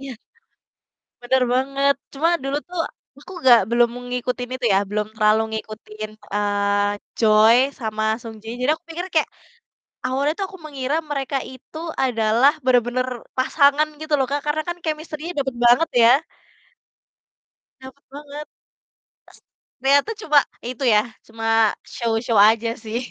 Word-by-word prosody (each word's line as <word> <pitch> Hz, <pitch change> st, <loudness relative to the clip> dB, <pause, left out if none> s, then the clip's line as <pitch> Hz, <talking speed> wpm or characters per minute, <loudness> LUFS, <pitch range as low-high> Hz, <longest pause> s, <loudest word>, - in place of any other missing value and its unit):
Iya. 275 Hz, -1 st, -7 dB, 1.1 s
Bener 255 Hz, +1 st, +2 dB
banget. 275 Hz, +2 st, +2 dB, 0.2 s
Cuma 305 Hz, +4 st, +1 dB
dulu 275 Hz, +1 st, -1 dB
tuh 360 Hz, -1 st, -5 dB, 0.4 s
aku 295 Hz, -, -13 dB, 0.2 s
gak 240 Hz, -1 st, +9 dB
belum 235 Hz, 0 st, +3 dB, 0.2 s
ngikutin 250 Hz, 0 st, -3 dB
itu 255 Hz, -1 st, -3 dB
ya, 195 Hz, -, +4 dB
belum 210 Hz, 0 st, -2 dB
terlalu 215 Hz, 0 st, +3 dB, 0.2 s
ngikutin, 215 Hz, 0 st, -8 dB, 0.2 s
eee, 205 Hz, 0 st, +1 dB, 0.3 s
Joy 220 Hz, +1 st, +6 dB, 0.2 s
sama 215 Hz, -2 st, -3 dB, 0.2 s
Sung 225 Hz, -1 st, -9 dB
Ji -, -, -12 dB
jadi 260 Hz, +4 st, +3 dB
aku 335 Hz, -, -41 dB
pikir 340 Hz, +2 st, -5 dB
kayak 315 Hz, -, +2 dB, 0.8 s
awalnya 275 Hz, +4 st, 0 dB
tuh 395 Hz, -, 0 dB
aku 380 Hz, -, -11 dB
mengira 280 Hz, 0 st, -2 dB
mereka 275 Hz, -1 st, -2 dB
itu 260 Hz, +4 st, -13 dB, 0.3 s
adalah 230 Hz, +2 st, +3 dB
bener-bener 250 Hz, 0 st, +2 dB, 0.3 s
pasangan 285 Hz, +3 st, +3 dB
gitu 310 Hz, -1 st, -4 dB
loh, 265 Hz, -, +1 dB
Kak, 285 Hz, 0 st, 0 dB
karena 300 Hz, +1 st, 0 dB
kan 345 Hz, 0 st, -3 dB
chemistry-nya 310 Hz, +1 st, -4 dB
dapet 265 Hz, -2 st, -2 dB
banget 245 Hz, +8 st, +5 dB
ya. 230 Hz, -, +7 dB, 1.7 s
Dapet 265 Hz, +2 st, -13 dB
banget, 290 Hz, +1 st, -9 dB, 0.9 s
s -, -, -18 dB, 0.4 s
ternyata 280 Hz, +8 st, +3 dB
cuma 300 Hz, -6 st, +4 dB, 0.3 s
itu 255 Hz, +2 st, -4 dB
ya, 210 Hz, -, +6 dB, 0.3 s
cuma 225 Hz, -1 st, +1 dB, 0.2 s
show-show 230 Hz, -1 st, 0 dB
aja 220 Hz, +3 st, +5 dB
sih. 220 Hz, +1 st, -3 dB
255 Hz, 140 wpm, -21 LUFS, 225-285 Hz, 1.7 s, gak